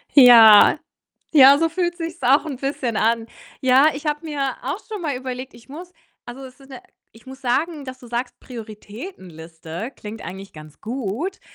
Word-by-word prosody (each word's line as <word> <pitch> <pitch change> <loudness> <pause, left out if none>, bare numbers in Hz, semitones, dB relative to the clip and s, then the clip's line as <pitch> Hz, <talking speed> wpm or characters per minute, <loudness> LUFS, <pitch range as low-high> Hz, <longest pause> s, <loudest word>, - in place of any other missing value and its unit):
Ja. 230 -6 +8 0.5
Ja, 280 -2 +7
so 330 0 +1
fühlt 345 +1 -2
sich's 335 0 -7
auch 270 +4 +3
'n 285 -4 -6
bisschen 260 -4 -3
an. 225 +1 0 0.3
Ja, 260 +3 +4
ich 285 +2 -9
habe 300 +2 -3
mir 280 -4 -3
auch 280 +9 -4
schon 425 -3 -7
mal 300 -5 -3
überlegt, 255 0 -7
ich 235 +2 -18
muss 340 +5 -10 0.3
also, 255 +3 -10
es 260 +2 -15
ist 270 0 -18
'ne 260 -2 -10 0.3
ich 225 -1 -20
muss 265 +1 -12
sagen 280 +4 -2
dass 260 -1 -9
du 245 - -14
sagst, 240 +2 -5
Prioritätenliste, 205 - -10
klingt 215 +1 -10
eigentlich 195 +1 -9
ganz 155 -1 -14
gut, 255 - -5
260 Hz, 175 wpm, -21 LUFS, 225-290 Hz, 0.5 s, Ja